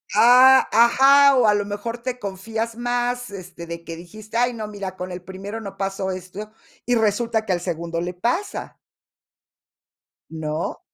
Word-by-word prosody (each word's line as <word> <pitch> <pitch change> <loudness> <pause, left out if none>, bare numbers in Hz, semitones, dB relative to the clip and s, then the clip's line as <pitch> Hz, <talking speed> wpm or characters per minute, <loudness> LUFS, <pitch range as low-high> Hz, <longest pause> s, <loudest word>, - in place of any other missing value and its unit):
Ah, 250 +4 +7
ajá. 270 +5 +6
O, 235 -3 +4
a 210 - +5
lo 205 -1 0
mejor, 210 +4 -5
te 250 +1 -4
confías 220 +3 -4
más, 245 0 -2
este, 185 -3 -9
de 170 0 -7
que 165 - -7
dijiste: 215 +7 -8
"Ay, 245 0 +2
no 215 -2 -5
mira, 200 -3 -6
con 185 0 -6
el 180 0 -6
primero 195 +4 -7
no 195 -2 -8
pasó 195 -1 -2
esto," 185 +4 -8 0.3
y 245 0 +2
resulta 220 +1 0
que 185 - 0
al 175 - -2
segundo 170 -1 -3
le 180 +1 -4
pasa 245 - -3 1.5
¿no? 155 0 -4
210 Hz, 165 wpm, -22 LUFS, 185-235 Hz, 1.5 s, Ah